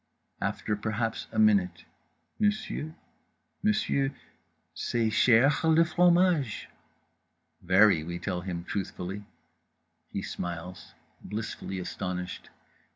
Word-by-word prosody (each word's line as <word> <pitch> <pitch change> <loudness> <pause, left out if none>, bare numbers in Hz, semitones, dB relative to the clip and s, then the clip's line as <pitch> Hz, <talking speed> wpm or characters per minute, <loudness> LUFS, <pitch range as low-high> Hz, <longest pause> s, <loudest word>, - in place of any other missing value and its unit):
After 105 - -1
perhaps 110 +2 -2
a 110 - -6
minute 100 -5 +3 0.5
"monsieur—monsieur—c'est 135 - -3
chèr 135 +7 +4
le 165 - +6
fromage?" 175 - +3 0.9
"Very," 95 -2 +5
we 85 +2 -4
tell 90 -1 -3
him 90 -2 -4
truthfully. 95 +1 -4 0.9
He - - -3
smiles, 90 +1 -6 0.3
blissfully 105 -2 -5
astonished. 90 0 -5
105 Hz, 80 wpm, -28 LUFS, 90-135 Hz, 0.9 s, le